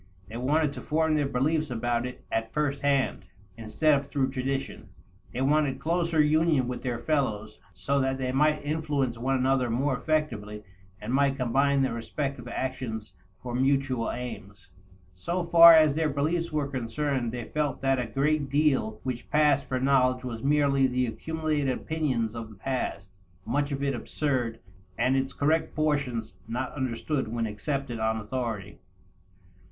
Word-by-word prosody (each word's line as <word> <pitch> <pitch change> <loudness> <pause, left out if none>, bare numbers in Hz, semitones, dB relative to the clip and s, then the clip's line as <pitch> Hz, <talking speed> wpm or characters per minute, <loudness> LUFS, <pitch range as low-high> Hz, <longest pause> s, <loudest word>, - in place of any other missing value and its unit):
They 115 - -6
wanted 145 +4 +1
to 125 - -7
form 160 +3 +1
their 150 -2 +1
beliefs 150 +4 0
about 120 0 -1
it 125 - -10
at 115 0 -1
first 145 -2 -1
hand, 140 -6 +1 0.3
instead 115 +7 +2
of 140 - -14
through 135 -2 0
tradition. 135 +1 -3 0.4
They 125 - -2
wanted 145 -1 +2
closer 170 0 0
union 150 -3 +3
with 125 0 -4
their 125 -2 -2
fellows 115 -6 -1
so 140 0 -1
that 135 0 0
they 130 -1 -2
might 150 +2 +2
influence 145 -6 -1
one 135 +3 0
another 130 -1 +2
more 130 +4 +1
effectively 115 -8 -2 0.4
and 110 +4 -4
might 140 0 +2
combine 135 +2 +2
their 130 -3 0
respective 135 +4 -4
actions 120 -4 -4 0.2
for 125 -1 -7
mutual 135 -2 +1
aims. 105 -6 -8 0.4
So 170 - -2
far 170 0 +9
as 155 -2 +5
their 155 +1 0
beliefs 160 +4 -1
were 150 -2 -1
concerned, 130 -1 -2
they 120 0 -4
felt 145 -3 -2
that 135 -1 +2
a 125 - -2
great 140 +4 0
deal 140 -7 +1
which 125 -2 -5
passed 150 -2 +3
for 130 - -1
knowledge 130 -1 +2
was 115 -3 -5
merely 140 -1 +3
the 125 0 0
accumulated 155 +3 -2
opinions 130 -9 -1
of 115 -1 -6
the 110 - -13
past, 100 -4 -4 0.3
much 145 0 0
of 140 0 -2
it 140 -1 +1
absurd 120 -2 -2 0.4
and 130 +1 +2
its 135 0 0
correct 160 +2 0
portions 140 -9 -1
not 125 +3 -3
understood 130 +1 -2
when 115 +1 -2
accepted 120 +3 -3
on 110 0 0
authority. 110 -3 -4
135 Hz, 160 wpm, -27 LUFS, 120-150 Hz, 0.4 s, far